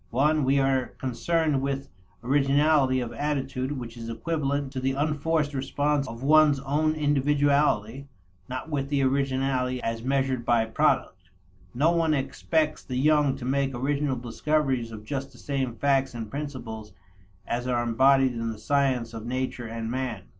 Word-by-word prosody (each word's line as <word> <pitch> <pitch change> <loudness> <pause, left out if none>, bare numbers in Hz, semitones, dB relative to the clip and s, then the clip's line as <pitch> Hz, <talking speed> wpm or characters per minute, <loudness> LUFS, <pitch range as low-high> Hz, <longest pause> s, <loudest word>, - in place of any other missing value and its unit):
(i) 145 +4 +4
We 140 -3 +2
are 135 -2 +1
concerned 145 +3 0
with 135 0 -2 0.4
originality 135 0 +3
of 120 -1 -5
attitude 135 -2 -2
which 120 -4 -7
is 115 -1 -7
equivalent 140 +2 -2
to 130 - -3
the 135 +1 0
unforced 150 +1 0
response 145 +1 0
of 115 +1 -8
one's 150 -1 +5
own 150 +3 +1
individuality, 140 -4 +1 0.4
not 130 +5 -5
with 140 -1 -2
originality 135 -2 0
as 115 0 -2
measured 130 -1 0
by 120 -1 +2
product. 110 - 0 0.5
No 150 +7 +3
one 165 -2 +2
expects 155 +3 -1
the 125 - -4
young 145 0 +3
to 130 -3 -7
make 135 0 0
original 140 +2 0
discoveries 130 0 -1
of 110 -1 -9
just 135 +3 -4
the - - -16
same 135 -4 -3
facts 135 -1 +1
and 115 -2 -6
principles 120 -8 -6 0.5
as 120 +1 -2
are 120 -1 +1
embodied 130 +3 +4
in 115 -1 -3
the 110 - -8
sciences 130 -1 0
of 115 0 -7
nature 130 -1 -3
and 115 0 -4
man. 125 -6 -3
135 Hz, 155 wpm, -26 LUFS, 125-145 Hz, 0.5 s, one's